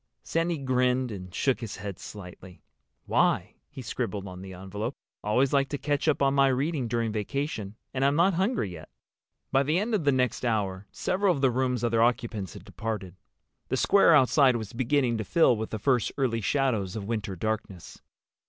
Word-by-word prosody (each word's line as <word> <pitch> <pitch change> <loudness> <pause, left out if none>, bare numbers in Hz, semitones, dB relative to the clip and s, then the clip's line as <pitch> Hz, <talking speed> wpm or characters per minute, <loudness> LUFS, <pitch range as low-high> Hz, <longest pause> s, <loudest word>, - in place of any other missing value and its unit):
Sandy 165 0 0
grinned 130 -2 +1
and 90 -3 -7
shook 135 +7 +1
his 115 -4 -6
head 100 -2 -7
slightly. 90 -2 -11 0.4
"Why?" - - +1 0.2
he 130 - -9
scribbled 115 -4 -3
on 90 0 -8
the 95 0 -8
envelope. 100 +7 -5 0.3
"Always 125 +7 +2
like 140 -1 +2
to 145 - -2
catch 145 +1 -1
up 145 -2 +2
on 135 0 +3
my 140 -1 +5
reading 135 0 0
during 115 -1 -1
vacation. 110 -1 -3 0.2
And 135 0 -1
I'm 140 +1 +3
not 180 +5 +4
hungry 190 - 0
yet." 80 -3 -10 0.6
By 135 - +4
the 150 +4 +1
end 215 +5 -1
of 200 -6 +1
the 145 - +4
next 130 -1 0
hour 100 -4 -1
several 185 -1 +1
of 135 - -4
the 135 -2 +4
room's 125 -1 0
other 115 -1 +2
occupants 115 -5 0
had - - -11
departed. 105 -5 -5 0.5
The - - -1
square 195 -5 +5
outside 135 -1 +5
was 110 -4 -5
beginning 125 -1 +1
to - - -1
fill 160 - +4
with 110 0 -4
the 110 - -3
first 125 +1 +1
early 120 -5 0
shadows 110 -5 0
of 105 -3 -4
winter 105 -3 -3
darkness. 110 -2 -4
120 Hz, 190 wpm, -27 LUFS, 105-140 Hz, 0.6 s, my